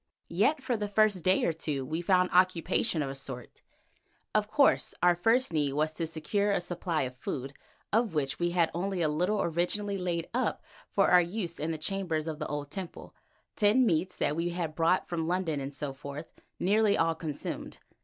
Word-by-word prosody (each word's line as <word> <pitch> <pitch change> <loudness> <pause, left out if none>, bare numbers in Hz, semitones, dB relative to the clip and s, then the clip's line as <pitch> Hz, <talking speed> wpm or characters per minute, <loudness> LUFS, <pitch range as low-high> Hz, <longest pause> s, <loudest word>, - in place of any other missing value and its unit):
Yet 265 - +2
for 250 -2 0
the 210 -2 -2
first 205 -3 +2
day 185 +1 +3
or 165 - +1
two 145 -4 -2
we 160 +5 -3
found 180 0 +3
occupation 180 -1 +2
of 135 - -3
a - - -5
sort. 135 -3 -7 0.7
Of - - +2
course - - +3
our 175 0 +6
first 225 +4 +2
need 145 -3 +1
was 155 +2 0
to 165 0 -3
secure 165 +6 -1
a 200 - +2
supply 175 -2 -2
of 130 -1 -4
food, 135 +2 -5 0.4
of 220 -5 +2
which 135 -3 -1
we 175 0 +1
had 170 -2 +2
only 180 +1 -1
a - - +3
little 180 +8 +1
originally 195 +4 -1
laid 170 -2 -2
up 250 -2 -1 0.3
for 195 - +2
our 180 - +8
use 175 -1 -3
in 155 - -2
the 160 - -2
chambers 165 -2 -2
of 155 -1 -4
the 150 - -3
old 145 -1 -4
temple, 190 -3 -7 0.4
tinned 220 +4 +4
meats 180 -1 +1
that 145 - 0
we 170 +2 -1
had 170 -3 -3
brought 165 +3 +2
from 165 -2 -2
London 175 -4 0
and 135 0 -4
so 145 -1 -5
forth, 140 +3 -8 0.3
now - - -2
nearly 210 +1 +4
all 165 0 +2
consumed. 160 -3 -5
170 Hz, 200 wpm, -29 LUFS, 155-195 Hz, 0.7 s, our